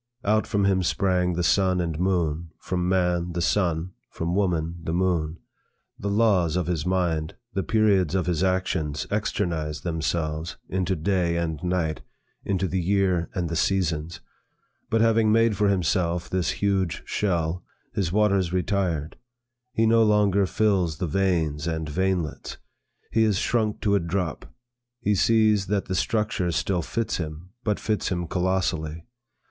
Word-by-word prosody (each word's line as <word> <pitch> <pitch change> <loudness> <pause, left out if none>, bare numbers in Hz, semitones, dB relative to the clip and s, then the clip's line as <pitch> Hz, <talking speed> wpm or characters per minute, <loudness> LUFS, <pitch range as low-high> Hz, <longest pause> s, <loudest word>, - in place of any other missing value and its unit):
Out 110 +2 +2
from 100 -3 +1
him 95 -1 +3
sprang 90 0 +1
the 90 +1 -1
sun 95 0 +3
and 85 -3 -2
moon; 85 -3 0
from 90 -1 -2
man, 90 -2 +1
the 85 - -2
sun; 85 -1 0 0.2
from 85 +1 -3
woman, 85 -4 0
the 80 0 -2
moon. 85 -3 0 0.6
The 100 - -2
laws 100 -6 +3
of 90 -2 0
his 85 -2 -2
mind, 85 -4 0 0.2
the 95 - 0
periods 95 -3 +2
of 95 - +1
his 90 -2 0
actions 90 -5 0
externized 85 -7 -2
themselves 80 -1 -2
into 95 0 -1
day 85 0 0
and 80 -2 -2
night, 90 -4 -1 0.4
into 95 -1 0
the 95 +2 -1
year 90 -2 +1
and 90 -3 -1
the 85 - -3
seasons. 85 -2 0 0.7
But, 110 0 +2
having 115 -1 +4
made 115 -1 +4
for 105 +1 +2
himself 90 -2 0
this 90 -3 0
huge 95 -4 0
shell, 85 -3 -1 0.3
his 95 -5 -1
waters 100 -3 +2
retired; 90 -5 -1 0.5
he 115 -1 +2
no 115 +1 +5
longer 105 -2 +3
fills 95 -7 +1
the 90 - -2
veins 80 -4 0
and 80 -1 -2
veinlets; 90 0 -2 0.5
he 115 - +3
is 105 -3 +2
shrunk 110 0 0
to 100 - +2
a 100 - +4
drop. 85 -2 -3 0.5
He 105 - +1
sees, 110 -1 +3
that 100 0 0
the 95 - -3
structure 105 -2 0
still 90 +2 0
fits 115 +7 -2
him, 80 +2 -6
but 105 -2 0
fits 110 -1 -1
him 85 -2 -2
colossally. 90 -3 -1
90 Hz, 155 wpm, -25 LUFS, 85-100 Hz, 0.7 s, no